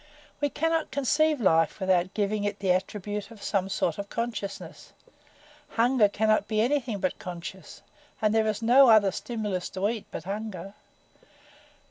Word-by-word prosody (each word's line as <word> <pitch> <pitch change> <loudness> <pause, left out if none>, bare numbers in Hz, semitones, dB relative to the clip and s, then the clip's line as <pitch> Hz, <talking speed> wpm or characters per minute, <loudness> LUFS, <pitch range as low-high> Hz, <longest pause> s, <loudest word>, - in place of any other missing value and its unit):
We 290 -1 +1
cannot 325 +2 0
conceive 295 +2 +1
life 165 -5 +2
without 185 -1 +1
giving 210 0 0
it 205 0 -2
the 195 -3 0
attribute 205 +3 -2
of 225 -3 -13
some 195 -2 0
sort 210 +1 -1
of 200 0 -5
consciousness. 230 -4 -5 0.8
Hunger 230 -2 +4
cannot 215 0 +1
be 215 -1 0
anything 245 -2 +1
but 185 - -2
conscious, 175 -1 -8 0.4
and 215 -1 +2
there 220 -1 +2
is 215 +1 -2
no 255 +3 +7
other 210 -3 +6
stimulus 210 -4 -4
to 190 +2 -1
eat 225 -2 -5
but - - -7
hunger. 195 -1 -6
210 Hz, 150 wpm, -27 LUFS, 195-230 Hz, 0.8 s, no